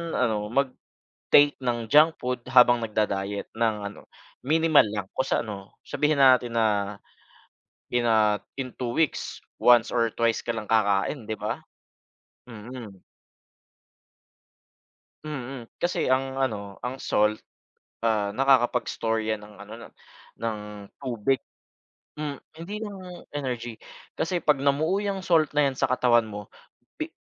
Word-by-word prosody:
ano, 110 -4 0
mag-take 140 +3 +1
ng 120 -3 -2
junk 155 +2 +6
food 125 0 -3
habang 125 -2 +6
nagda 110 -1 0
diet 100 0 -3
ng 115 -1 +1 0.2
ano, - - -16 0.3
minimal 155 -1 +4
lang 105 -2 -4
kus 130 - 0
ano 100 -3 -5
sabihin 150 -1 0
natin 125 -3 +5
na, 105 -2 +1 0.9
in 120 0 0
a 110 -2 +4 0.2
in 130 -2 -6
2 120 -2 -3
weeks 160 +4 -1 0.2
once 120 -2 +5
or 115 -2 +1
twice 115 -1 0
ka 120 - -1
lang 110 -2 -6
kakain 110 +4 +1
'di 110 0 -4
ba? 105 - -4 0.9
Mm. 110 -3 -10 2.2
Mm. 135 -4 -6 0.2
Kasi 175 - 0
ang 135 0 0
ano, 105 -7 -2
ang 130 +2 -5
salt, 105 +1 +1 0.6
ah, 105 -3 +1
nakakapag 130 -1 +3
store 115 0 -1
yan 110 -1 -2
ng 105 - -16
ano 105 +1 -11
na, 115 - -11 0.5
ng 115 -2 -1 0.4
tubig. 130 0 0 0.8
Hmm 150 -2 -4 0.2
hindi 180 +6 -6
yung 190 -4 -8
energy, 120 -5 -3 0.4
kasi 175 +2 -1
pag 150 -3 +3
namuo 155 +8 +1
yang 200 -1 -2
salt 165 -5 +2
na 150 -1 +3
yan 135 - -3
sa 135 - -3
katawan 120 -2 +4
mo 105 -2 -8 0.5
bi - - -5
120 Hz, 135 wpm, -26 LUFS, 110-140 Hz, 2.2 s, junk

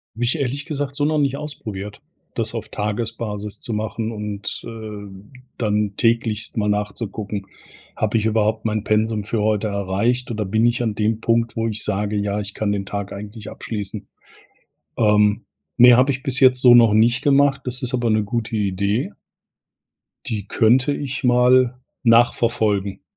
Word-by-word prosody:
Habe 120 +1 -1
ich 120 - 0
ehrlich 140 +2 -3
gesagt 145 -3 -4
so 145 - 0
noch 155 +1 +1
nicht 140 -2 +1
ausprobiert, 105 -9 -7 0.4
das - - -2
auf - - -5
Tagesbasis 105 -1 -4
zu 115 - -4
machen 110 +1 -3
und, 105 -2 -5
äh, 105 0 -9 0.2
dann 105 -2 0
täglich 115 -2 0
mal 105 -1 0
nachzugucken: 105 -1 -3 0.5
„Habe 110 +1 +1
ich 110 - -3
überhaupt 110 0 +1
mein 110 -1 -1
Pensum 110 0 0
für 105 +1 -2
heute 110 0 +1
erreicht 100 +5 -1
oder 110 -3 -2
bin 110 +4 +1
ich 120 0 0
an 110 -3 -1
dem 110 +1 0
Punkt, 115 0 0
wo 115 0 -1
ich 110 -1 -3
sage: 105 +1 -1
,Ja, 100 0 -1
ich 100 -1 -5
kann 105 -2 -1
den 100 -1 -2
Tag 100 0 -5
eigentlich 105 +2 -8
abschließen'?“ 105 -2 -6 0.9
Ähm, 105 -2 +3 0.3
ne, 125 0 +8
habe 130 +3 +4
ich 130 +1 -7
bis 130 -3 0
jetzt 130 -1 +5
so 125 -2 +8
noch 115 -3 +6
nicht 120 +3 +3
gemacht, 140 -1 +3
das 125 0 -4
ist 125 0 -1
aber 120 -2 0
'ne 110 -1 +2
gute 115 +1 -3
Idee. 100 +2 -1 1.2
Die 105 -4 -3
könnte 125 +5 +3
ich 140 -2 -4
mal 125 0 +4 0.2
nachverfolgen 115 -4 +2
110 Hz, 165 wpm, -21 LUFS, 105-120 Hz, 1.2 s, ne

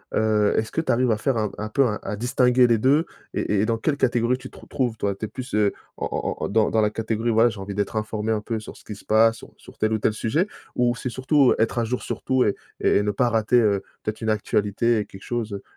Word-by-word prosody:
Heu, 105 -1 +2
est-ce 110 0 -1
que - - -2
tu 165 - 0
arrives 125 0 +2
à 110 - +1
faire 135 +4 0
un 105 -2 -1
un 105 - -4
peu 135 +6 +2
à 105 - -1
à 105 - -3
distinguer 125 +2 +3
les 115 -1 +3
2? 140 +8 +3 0.3
Et 100 -1 0
et - - +2
dans 115 0 0
quelle 140 +6 -1
catégorie 120 -1 +1
tu 130 0 -10
te - - -17
retrouves 125 -4 -2
toi? 100 -2 -1
Tu 100 +3 -5
es - - -5
plus, 130 +4 -8
heu, 105 -1 +2 0.2
en - - -3
en - - -3
en - - -1
dans 110 +1 +2
dans 110 - +2
la 105 - +3
catégorie 110 +2 -2
«voilà 115 +2 +5
j'ai 110 -3 -8
envie 95 +1 -6
d'être 100 +2 -2
informé 110 0 -2
un 110 -1 0
peu 110 +1 -3
sur - - -10
ce - - -19
qui 105 - -7
se 105 - -15
passe 115 +1 +4
sur - - -12
sur - - -16
tel 110 0 0
ou 110 - +1
tel 110 - +1
sujet» 135 - 0 0.3
ou 120 0 +2
c'est 125 - -4
surtout 130 +2 +3
«être 115 +2 +1
à - - +1
jour 125 +2 -2
sur - - -5
tout 130 -1 +2
et 105 - +1 0.2
et - - +3
ne 105 - 0
pas 120 +5 +1
rater, 115 +1 +3
heu, 100 -4 +2 0.2
peut-être 110 +2 -4
une 110 - -1
actualité 105 +2 +1
et 105 - -2
quelque 95 - -13
chose, 120 -3 -3
heu,»? 100 - -6
110 Hz, 280 wpm, -23 LUFS, 105-125 Hz, 0.3 s, voilà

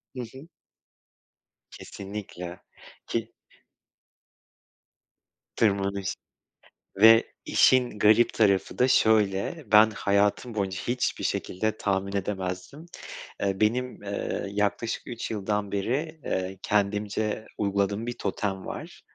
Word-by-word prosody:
Hı - - -6
hı. 135 +4 -11 1.2
Kesinlikle, 95 -3 -8 0.5
ki 115 0 -2 2.2
tırmanış 100 -2 0 0.8
ve 115 +3 +7
işin 125 -4 +3
garip 110 +3 +5
tarafı 100 -5 +2
da 125 - +5
şöyle: 110 - +2
Ben 105 +1 +8
hayatım 105 +3 +1
boyunca 95 -2 -2
hiçbir 125 +1 -1
şekilde 110 +4 -1
tahmin 100 0 -1
edemezdim. 95 - -4 0.6
Eee, 95 -1 0
benim, 125 +2 0
eee, 100 0 -3
yaklaşık 105 +3 -1
3 120 -2 -5
yıldan 105 -1 -2
beri, 140 +11 -2
eee, 95 0 -2
kendimce 105 +1 0
uyguladığım 100 +2 0
bir 120 - -4
totem 95 -3 -3
var. - - -8
105 Hz, 95 wpm, -27 LUFS, 100-115 Hz, 2.2 s, Ben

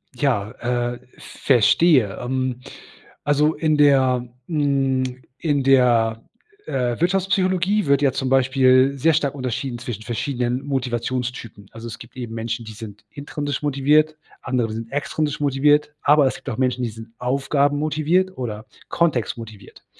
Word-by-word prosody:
Ja, 120 -6 0 0.4
äh, 120 - -10 0.2
verstehe. 130 - +3
Ähm, 130 0 -2 0.6
also 150 +2 +2
in 155 0 +1
der 130 -4 +3 0.2
hm, 135 -4 0 0.2
in 145 -4 0
der, 120 -4 +3 0.4
äh, 125 -1 -2
Wirtschaftspsychologie 190 +2 +1
wird 140 0 +3
ja 135 -2 +3
zum 130 +1 -3
Beispiel 130 +1 +4
sehr 160 +5 +3
stark 145 -2 0
unterschieden 130 -1 -3
zwischen 120 -3 -6
verschiedenen 125 +2 -2
Motivationstypen. 125 -5 -3
Also, 115 +1 -9
es 115 - -7
gibt 120 +2 -14
eben 120 -2 -6
Menschen, 115 0 -4
die 110 - -8
sind 105 -1 -10
intrinsisch 145 0 -4
motiviert, 150 +2 +2 0.2
andere 120 -4 -1
sind 115 +1 -6
extrinsisch 145 +1 -2
motiviert, 145 +1 +2
aber 145 0 +5
es - - -2
gibt - - -8
auch 110 - -4
Menschen, 125 -1 0
die 115 - -1
sind 115 +1 -11
Aufgaben-motiviert 145 +7 +1
oder 110 -3 -5 0.2
Kontext-motiviert. 115 - -3
130 Hz, 135 wpm, -22 LUFS, 120-145 Hz, 0.6 s, aber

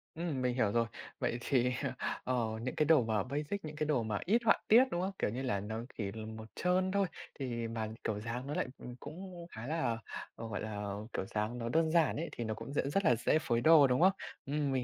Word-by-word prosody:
Ừm, 160 -6 -2
mình 125 -1 +1
hiểu 110 -5 +2
rồi. 115 +1 +3 0.3
Vậy 120 - 0
thì, 125 -1 +2 0.5
ờ, 125 -3 +1 0.2
những 130 +2 -3
cái 155 - +3
đồ 155 -6 +6
mà 110 -3 +1
basic, 150 +8 -3
những 155 0 -6
cái 155 0 -1
đồ 140 -6 +2
mà 105 -2 -1
ít 225 +7 +3
họa 225 - +6
tiết, 240 +4 +8
đúng 175 - 0
không? 190 +2 -1
Kiểu - - +1
như 125 +5 -3
là, 125 -7 0
nó 110 +3 -4 0.2
chỉ 100 -3 -2
là 110 +1 -6
màu 110 0 -7
trơn 185 +2 +2
thôi 200 -1 +2 0.3
thì 120 -4 -2
mà 115 -1 -3 0.2
kiểu 105 -2 -1
dáng 115 +4 -4
nó 145 - -3
lại, - - 0
ừm, 125 0 -8
cũng 175 +3 -8
khá 115 +3 -7
là, 155 -8 0 0.4
ờ, 115 - -6
gọi 110 - -3
là, 105 -2 -3 0.2
kiểu - - -2
dáng 105 +4 -2
nó 115 -1 -3
đơn 160 +4 +2
giản 165 -2 +4
ấy, 165 +3 -3
thì 120 - -4
nó 110 -1 -1
cũng 115 +5 -7
dễ - - +2
rất 195 +5 +1
là 125 - +6
dễ 120 +6 +2
phối 120 -6 0
đồ, 155 -1 +8
đúng 125 +3 +2
không? 190 +2 +7 0.3
Ừm, 145 0 0
mình 130 -2 +1
125 Hz, 250 wpm, -33 LUFS, 115-160 Hz, 0.5 s, tiết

